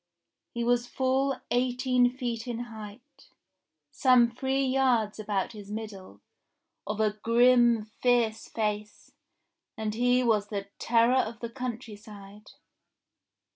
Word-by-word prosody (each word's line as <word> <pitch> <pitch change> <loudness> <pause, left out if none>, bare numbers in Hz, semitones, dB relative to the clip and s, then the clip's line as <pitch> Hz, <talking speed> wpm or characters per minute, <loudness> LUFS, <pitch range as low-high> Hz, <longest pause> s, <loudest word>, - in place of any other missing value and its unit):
He 235 - -1
was 240 0 +1
full 265 +2 0 0.2
eighteen 250 0 +2
feet 245 -2 -5
in 240 -2 -3 0.2
height, 235 +7 -12 0.6
some 245 - +4
three 265 +3 -1
yards 255 -5 +1
about 205 -2 -2
his 205 -2 -11
middle, 205 - -8 0.7
of 210 +1 -3
a 215 -1 +2
grim 240 -1 +4 0.2
fierce 235 -3 +1
face, 210 -1 -4 0.7
and 215 -1 -3
he 245 +2 +2
was 215 -4 +2
the 200 -1 -5
terror 235 +1 +3
of 230 -2 -1
all - - -28
the 235 -1 -5
country 240 -3 -6
side. 205 -1 -14
235 Hz, 125 wpm, -28 LUFS, 215-250 Hz, 0.7 s, some